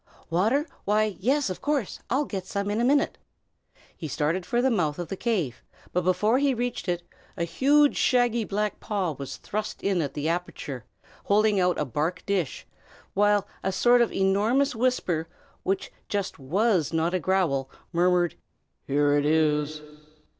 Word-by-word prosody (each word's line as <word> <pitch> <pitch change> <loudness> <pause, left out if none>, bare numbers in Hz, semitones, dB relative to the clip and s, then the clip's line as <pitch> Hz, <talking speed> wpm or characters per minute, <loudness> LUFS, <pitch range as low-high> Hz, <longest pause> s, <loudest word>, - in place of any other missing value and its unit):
"Water? 220 - +2 0.2
Why, 210 0 +1
yes, 260 +2 +1
of 185 - -7
course! 285 -8 -1
I'll 280 +4 +1
get 190 -7 -5
some 200 0 -2
in 215 +3 0
a - - +1
minute." 280 +4 +2 0.8
He 160 - -6
started 160 +6 -1
for 240 - +1
the 260 +1 +3
mouth 160 -9 0
of 175 - -5
the 195 - -3
cave, 185 - -1 0.3
but 180 - +2
before 210 +7 +2
he 280 -2 +2
reached 240 -4 -3
it, 175 -1 -1 0.3
a 170 - 0
huge, 285 - +3
shaggy, 240 -2 +3
black 210 0 -2
paw 195 -5 -1
was 140 -1 -7
thrust 215 +1 -5
in 195 -3 +1
at 145 - -4
the 150 +1 -2
aperture, 165 -6 -3 0.4
holding 210 0 +3
out 180 -1 +2
a 150 - 0
bark 150 +7 -2
dish, 190 -8 -1 0.5
while 205 0 +3
a 190 - -1
sort 240 +6 +4
of 235 - +2
enormous 215 +9 +2
whisper, 220 -10 0 0.3
which 190 0 -2 0.2
just 200 -2 -2
was 180 - +1
not 165 +1 0
a 185 - +1
growl, 160 -7 +1 0.2
murmured, 175 -1 +3 0.5
"Here 145 +1 +3
it 145 - +1
is!" 150 -1 +1
190 Hz, 165 wpm, -26 LUFS, 165-225 Hz, 0.8 s, sort